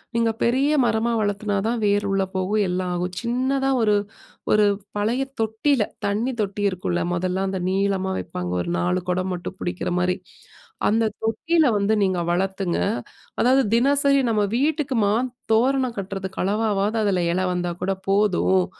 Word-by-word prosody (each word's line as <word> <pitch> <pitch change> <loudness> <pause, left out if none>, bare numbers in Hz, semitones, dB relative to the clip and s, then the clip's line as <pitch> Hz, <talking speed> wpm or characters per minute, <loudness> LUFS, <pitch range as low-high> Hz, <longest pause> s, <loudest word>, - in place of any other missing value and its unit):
"நீங்க 230 -1 +2
பெரிய 265 +5 +2
மரமா 230 +1 +1
வளர்த்தா 205 0 -1
தான் 235 +1 0
வேர் 205 0 +2
உள்ள 195 0 +2
போகும், 200 +3 +1
எல்லாம் 180 0 -1
ஆகும். 180 +1 -3
சின்னதா 260 +3 0
ஒரு 210 -1 +3 0.6
ஒரு 210 0 +5 0.3
பழைய 230 +6 0 0.2
தொட்டில 225 +3 +1 0.2
தண்ணி 210 +6 0
தொட்டி 205 0 -2
இருக்கும்ல, 180 -2 -2
மொதல்ல 185 +2 -1
அந்த 190 -1 -2
நீளமா 190 0 0
வைப்பாங்க. 90 0 -5
ஒரு 85 - -3
4 90 +1 0
குடம் 185 +1 0
மட்டும் 180 +1 -6
புடிக்கிற 175 0 -3
மாரி. 180 0 +1 0.7
அந்த 225 +1 +2 0.2
தொட்டில 310 +9 +2
வந்து 205 +2 +1
நீங்க 185 -2 +1
வளருங்க, 190 0 -1 0.6
அதாவது 260 +3 +4
தினசரி 275 +3 +3
நம்ம 215 -2 +2
வீட்டுக்கு 290 -1 0
மாத்தோரணம் 245 +3 +1
கட்டுறதுக்கு 190 -1 -5
அளவாவது 210 +1 0
அதுல 190 -4 +1
இலை 185 +1 0
வந்தா 175 -1 -2
கூட 195 +1 +1 0.2
போதும். 180 - +3
205 Hz, 145 wpm, -23 LUFS, 185-235 Hz, 0.7 s, ஒரு